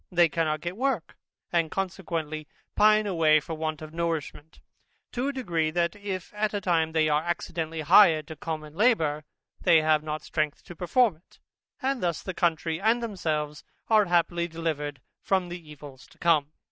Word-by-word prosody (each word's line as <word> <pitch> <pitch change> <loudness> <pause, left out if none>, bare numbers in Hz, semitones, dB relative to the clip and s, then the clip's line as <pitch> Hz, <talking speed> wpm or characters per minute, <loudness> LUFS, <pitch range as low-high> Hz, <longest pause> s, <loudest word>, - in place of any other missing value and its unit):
They 175 -2 +4
cannot 155 -1 -1
get 175 +3 -5
work, 260 -9 -1 0.4
and 165 -2 +2
consequently 165 -5 -3 0.3
pine 215 0 +5
away 160 -5 +4
from 155 +2 -7
want 155 -1 -3
of 155 0 -10
nourishment, 165 -2 -4 0.5
to 250 +3 -2
a - - 0
degree, 175 - -1
that 170 +3 0
if 200 -3 -6
at 210 0 -1
any 205 - -1
time 165 -4 +1
they 160 -1 +3
are 150 0 +2
accidentally 165 -1 -3
hired 160 -1 +6
to 160 - -6
common 155 0 -6
labour, 160 -8 +2 0.4
they 160 -2 +5
have 155 -1 +3
not 155 0 -5
strength 155 -2 -2
to 175 - -11
perform 195 +2 +2
it, 170 - -26 0.5
and 270 -1 0
thus 170 -3 -1
the 190 - -4
country 165 -1 0
and 230 +3 +2
themselves 155 -8 -3 0.3
are 215 -2 +5
happily 170 -1 +1
delivered 155 -4 -4 0.2
from 190 -2 0
the 175 -3 -8
evils 140 -3 -12
to - - -22
come. 155 -4 +2
165 Hz, 170 wpm, -27 LUFS, 155-190 Hz, 0.5 s, hired